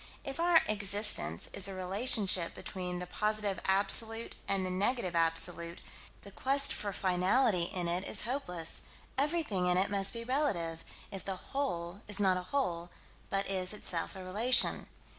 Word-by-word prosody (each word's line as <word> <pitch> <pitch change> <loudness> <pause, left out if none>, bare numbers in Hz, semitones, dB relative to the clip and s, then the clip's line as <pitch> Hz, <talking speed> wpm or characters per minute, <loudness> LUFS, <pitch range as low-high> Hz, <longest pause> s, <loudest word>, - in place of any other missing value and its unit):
If 275 +3 -7
our 340 -1 +4
"existence" 200 - +6
is 195 - 0
a 195 - -7
relationship 190 -1 +2
between 180 -1 -6
the 180 - -6
Positive 210 +1 -2
Absolute 215 +4 +2
and 195 -1 -1
the 185 - -4
Negative 190 -1 -2
Absolute, 170 +1 -1 0.4
the 200 - -12
quest 275 +6 +1
for 205 -1 -5
finality 185 +1 0
in 180 -2 -3
it 175 +2 -2
is - - -2
hopeless: 210 - -1 0.3
everything 275 - -1
in 180 0 +1
it 195 +2 0
must 195 -1 0
be 230 -1 -7
relative, 200 - -2 0.3
if 195 - -7
the 195 - -5
"whole" 180 -5 -5
is 205 0 -1
not 190 -2 +2
a 180 - -4
whole, 175 -12 -3 0.4
but 195 0 -2
is, 185 0 -1
itself, 180 -5 -2
a 190 - -9
relation. 220 +8 +3
195 Hz, 160 wpm, -30 LUFS, 180-225 Hz, 0.4 s, existence